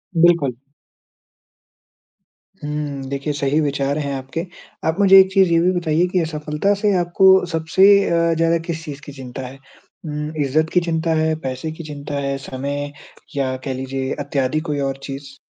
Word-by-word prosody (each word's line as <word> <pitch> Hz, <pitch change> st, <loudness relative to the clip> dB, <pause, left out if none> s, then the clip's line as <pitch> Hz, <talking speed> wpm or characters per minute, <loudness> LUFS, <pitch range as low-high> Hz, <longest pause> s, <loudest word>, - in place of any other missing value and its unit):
बिल्कुल। 165 Hz, -7 st, +3 dB, 2.1 s
हुँ। 150 Hz, -2 st, -3 dB
देखिए, 140 Hz, +2 st, -2 dB
सही 145 Hz, +1 st, 0 dB
विचार 140 Hz, 0 st, -1 dB
हैं 140 Hz, -2 st, -2 dB
आपके। 135 Hz, +6 st, -5 dB, 0.4 s
आप 160 Hz, +5 st, 0 dB
मुझे 195 Hz, -1 st, +8 dB
एक 190 Hz, 0 st, +5 dB
चीज़ 190 Hz, -3 st, +5 dB
ये 165 Hz, -, +5 dB
भी 180 Hz, -, +3 dB
बताइए 165 Hz, +1 st, +1 dB
कि 185 Hz, -, +2 dB
असफलता 155 Hz, +4 st, -1 dB
से 205 Hz, -2 st, +3 dB
आपको 190 Hz, +2 st, +5 dB
सबसे 165 Hz, +4 st, +3 dB, 0.2 s
अ, 170 Hz, 0 st, +2 dB
ज़्यादा 165 Hz, +1 st, +2 dB
किस 165 Hz, -1 st, -4 dB
चीज़ 145 Hz, -1 st, -7 dB
की 145 Hz, -, -8 dB
चिंता 130 Hz, -1 st, -8 dB
है? 135 Hz, -, -11 dB, 0.5 s
उम, 150 Hz, 0 st, -4 dB
इज्जत 155 Hz, +4 st, +1 dB
की 180 Hz, -, +5 dB
चिंता 165 Hz, -1 st, 0 dB
है? 160 Hz, 0 st, +1 dB
पैसे 130 Hz, +2 st, -4 dB
की 160 Hz, +1 st, -9 dB
चिंता 145 Hz, -1 st, -6 dB
है? 140 Hz, 0 st, -2 dB
समय 140 Hz, +2 st, -4 dB, 0.4 s
या 130 Hz, -2 st, 0 dB
कह 135 Hz, -, -2 dB
लीजिये 130 Hz, +1 st, -4 dB
इत्यादि 140 Hz, +2 st, -1 dB
कोई 145 Hz, -1 st, -1 dB
और 135 Hz, -, -5 dB
चीज़? 135 Hz, 0 st, -8 dB
150 Hz, 165 wpm, -20 LUFS, 140-165 Hz, 2.1 s, मुझे